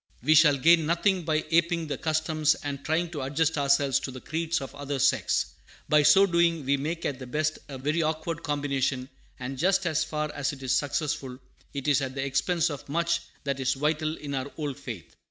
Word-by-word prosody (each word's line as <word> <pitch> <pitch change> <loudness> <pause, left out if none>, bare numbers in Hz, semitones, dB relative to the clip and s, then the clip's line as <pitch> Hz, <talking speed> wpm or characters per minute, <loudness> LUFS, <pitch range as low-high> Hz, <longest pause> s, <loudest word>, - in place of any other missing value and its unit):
We 155 +4 +5
shall 150 -2 +6
gain 165 +3 +5
nothing 175 +1 +1
by 155 -1 0
aping 170 0 +2
the 145 -2 -3
customs 155 -1 +1
and 140 -1 -4
trying 165 +2 0
to 150 -5 -4
adjust 150 +4 0
ourselves 140 -1 +2
to 140 - -5
the 130 0 -8
creeds 160 +4 -2
of 135 - -8
other 145 0 -4
sects. 130 - +1 0.4
By 150 0 +5
so 155 +7 +6
doing 170 -4 +2
we 140 +1 +3
make 160 +5 -3
at 135 -2 -2
the 130 - -8
best 155 +4 -1
a 135 - -6
very 150 +5 0
awkward 160 +1 -2
combination, 140 -3 -1 0.3
and 130 +1 -5
just 190 +2 +2
as 160 -2 +1
far 150 -1 -3
as 145 0 -2
it 135 -1 -10
is 130 - -1
successful, 140 -3 -1 0.4
it 140 0 -4
is 145 -1 +3
at 130 0 -4
the 135 0 -2
expense 155 +5 +1
of 145 0 -8
much 170 +2 +1 0.2
that 140 -1 -2
is 130 0 +1
vital 155 +2 -1
in 145 -1 -6
our 135 +1 -3
old 145 -3 -4
faith. 115 - -8
150 Hz, 210 wpm, -27 LUFS, 140-160 Hz, 0.4 s, shall